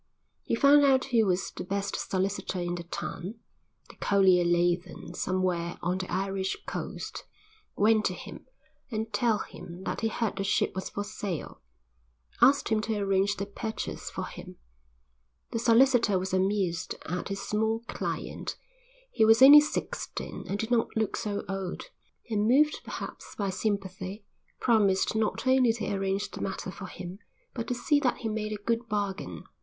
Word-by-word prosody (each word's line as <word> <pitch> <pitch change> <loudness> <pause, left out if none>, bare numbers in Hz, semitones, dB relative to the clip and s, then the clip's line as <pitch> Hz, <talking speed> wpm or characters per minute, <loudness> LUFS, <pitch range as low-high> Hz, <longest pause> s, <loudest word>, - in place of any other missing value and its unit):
He - - -1
found 285 +4 +6
out 265 -2 +4
who 230 -5 +3
was 180 0 0
the - - -6
best 200 +2 -2
solicitor 190 0 -1
in 175 0 -2
the 175 -1 -5
town 180 +4 -5 0.5
the - - -15
collier 190 -3 +4
lay 175 0 +3
then 175 -1 -11
somewhere 180 -2 -1
on 180 +2 0
the 185 - -5
Irish 190 +1 -1
coast - - -5 0.5
went 215 +1 +4
to - - 0
him, - - -10 0.4
and, 220 -2 -3
telling 220 0 +1
him 175 +2 -9
that - - -3
he 225 - +2
heard 220 -2 -2
the 195 - -1
ship 200 - +1
was 190 0 -4
for 205 - -3
sale, 205 -5 -5 0.8
asked 280 +1 +5
him 220 -1 +2
to 220 0 -1
arrange 195 0 +2
the 200 - -3
purchase 220 +2 -5
for - - -4
him. 180 0 -10 1.0
The 230 - -1
solicitor 235 -3 +5
was 185 +1 -3
amused 185 -2 0
at 180 +2 -3
his 195 0 -4
small 220 +2 0
client, 235 - -4 0.6
he 220 - +2
was 225 +3 +7
only 290 +2 +11
sixteen 300 - -4
and 200 - -2
did 225 +3 -3
not 235 -2 +3
look 220 -2 0
so 205 -2 -3
old, 195 - -5 0.4
and, 215 -2 +1
moved 300 +5 +4
perhaps - - -7
by 200 -2 -1
sympathy, 195 0 -3 0.3
promised 205 -5 +3
not 220 +3 0
only 260 -2 +5
to 215 -3 -3
arrange 195 0 -1
the - - -7
matter 190 -1 -3
for 190 0 -8
him 180 +1 -8 0.3
but 230 -2 -4
to 245 - -1
see 290 +4 +2
that 260 -4 +1
he 225 - -3
made 215 0 -2
a - - -1
good 230 0 0
bargain. 205 -2 -3
205 Hz, 170 wpm, -28 LUFS, 190-225 Hz, 1.0 s, only